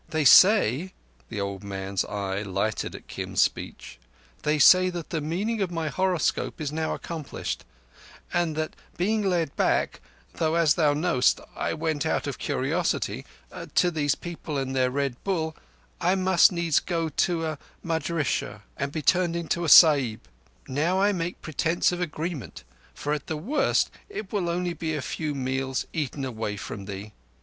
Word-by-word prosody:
"They 155 -2 0
say,"—the 125 - +4
old 100 0 -4
man's 95 -1 -2
eye 100 -1 -3
lighted 100 +2 -2
at - - -11
Kim's - - -4
speech - - -4 0.4
"they 150 +1 +1
say 185 +5 +7
that 175 -3 -6
the 160 - -1
meaning 200 +9 -2
of 190 - 0
my 165 -2 -2
horoscope 185 +1 0
is 150 -3 -3
now 160 +1 -1
accomplished, 160 -4 -5 0.7
and 170 -3 +1
that 155 0 -3 0.2
being 215 +5 +1
led 175 -7 0
back—though 65 - -1
as 165 -3 +4
thou 150 -3 +2
knowest 155 -5 +2 0.2
I - - -2
went 160 -2 -1
out - - 0
of - - -4
curiosity—to 180 - -1
these 145 -3 +1
people 165 -3 -6
and 135 -1 -2
their 130 -1 +3
Red 135 -2 -2
Bull 160 -5 -1 0.5
I 180 +2 +3
must 190 +1 +5
needs 170 -3 +2
go 165 -2 -2
to 165 +2 0
a 155 -2 -4 0.2
madrissah 160 -2 -2
and 140 0 -2
be 155 0 -4
turned 175 0 +3
into 170 0 -1
a - - 0
Sahib. 140 -8 +7 0.5
Now 160 +8 +1
I 200 +1 +4
make 175 -2 -4
pretence 165 +3 +1
of 175 0 -3
agreement, 160 - -4 0.3
for 145 - -2
at 150 -2 -4
the 155 - -2
worst 250 - +1 0.2
it 220 - -7
will 175 -3 0
be 175 -1 -1 0.2
but - - -1
a - - -3
few 150 -3 -3
meals 130 0 -2
eaten 145 -3 -2
away 110 -4 -4
from 100 0 -7
thee. 100 +1 -7
155 Hz, 160 wpm, -26 LUFS, 135-175 Hz, 0.7 s, say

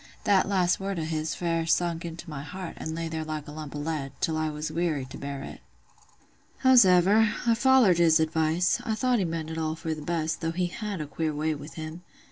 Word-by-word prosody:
That 195 -1 +3
last 180 -3 +2
word 195 -1 -3
o' 165 - -2
his 155 -1 -2
fair 165 -2 -1
sunk 170 0 +1
into 170 +1 -7
my 150 -3 -6
heart, 180 +4 -7
an' 160 0 -4
lay 165 0 -3
there 160 -1 -3
like 155 -1 -5
a - - -7
lump 150 -1 -7
o' - - -3
lead, 145 -3 -3
till 160 - 0
I 155 0 0
was 150 +1 -4
weary 160 -5 -1
to 130 - -10
bear 140 -1 -5
it. - - -9 1.0
"Howsever, 210 -3 +6
I 235 - +4
follered 235 -6 +5
his 165 -1 +5
advice: 160 +2 +1
I 220 - -1
thought 250 +1 +1
he 190 - +1
meant 165 -1 -4
it 160 - -4
all 160 0 -1
for 160 0 -3
th' 155 -1 -7
best, 160 0 -2
though 165 0 -1
he 180 +1 0
had 205 -1 -4
a - - -3
queer 155 +1 -3
way 155 +1 0
with 150 +1 -9
him. 160 +1 -7
165 Hz, 230 wpm, -27 LUFS, 155-180 Hz, 1.0 s, Howsever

